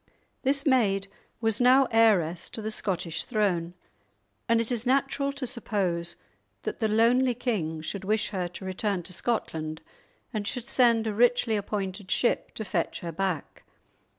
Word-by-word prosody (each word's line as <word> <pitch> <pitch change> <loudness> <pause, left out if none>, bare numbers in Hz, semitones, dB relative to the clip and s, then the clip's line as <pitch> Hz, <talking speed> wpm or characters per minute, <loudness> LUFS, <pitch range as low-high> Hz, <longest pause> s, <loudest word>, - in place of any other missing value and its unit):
This 275 +1 +2
maid 205 -8 +3 0.3
was 225 0 +2
now 260 +2 +6
heiress 185 -7 +3
to 225 - -7
the 220 - -2
Scottish 175 -6 -2
throne, 180 -7 0 0.7
and 230 0 +4
it 230 +1 -1
is 235 -2 -1
natural 275 +2 +1
to 280 -2 -4
suppose 190 -8 -1 0.5
that - - -4
the 220 - +2
lonely 240 +4 +3
king 195 -11 -2
should 195 +4 -5
wish 215 +2 0
her 185 -4 -2
to 180 +2 -9
return 190 0 -1
to 185 - -8
Scotland, 160 -7 -2 0.5
and 210 -2 -2
should 245 -2 -3
send 235 -3 +3
a 215 - -1
richly 235 0 +3
appointed 200 -1 -3
ship 240 - +1
to 220 - -4
fetch 170 -3 -2
her 170 - -4
back. 180 -1 -3
215 Hz, 155 wpm, -27 LUFS, 180-240 Hz, 0.7 s, now